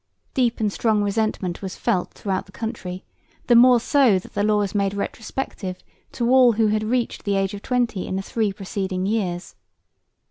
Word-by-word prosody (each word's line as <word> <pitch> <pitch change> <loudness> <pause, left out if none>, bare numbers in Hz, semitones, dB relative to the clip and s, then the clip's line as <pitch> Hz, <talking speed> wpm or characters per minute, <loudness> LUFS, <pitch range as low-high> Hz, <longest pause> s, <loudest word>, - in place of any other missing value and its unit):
Deep 245 -3 +1
and 210 -2 0
strong 215 -3 +1
resentment 200 -4 -1
was 190 -2 -5
felt 180 - 0
throughout 190 -2 -3
the - - -16
country, 190 -4 -5 0.4
the 240 - +4
more 245 +1 +7
so 255 -5 +4
that 185 - -8
the - - -1
law 210 0 +3
was 205 -2 -1
made 200 -1 0
retrospective 200 -2 -4 0.3
to 235 - -1
all 255 -2 +6
who 220 0 +2
had 215 0 +1
reached 240 +2 -1
the 200 -1 0
age 195 0 0
of 200 - -7
twenty 240 -6 -1
in - - -3
the 195 - -2
three 215 0 -1
preceding 190 -1 -3
years. 190 -4 -2
210 Hz, 185 wpm, -23 LUFS, 195-230 Hz, 0.4 s, more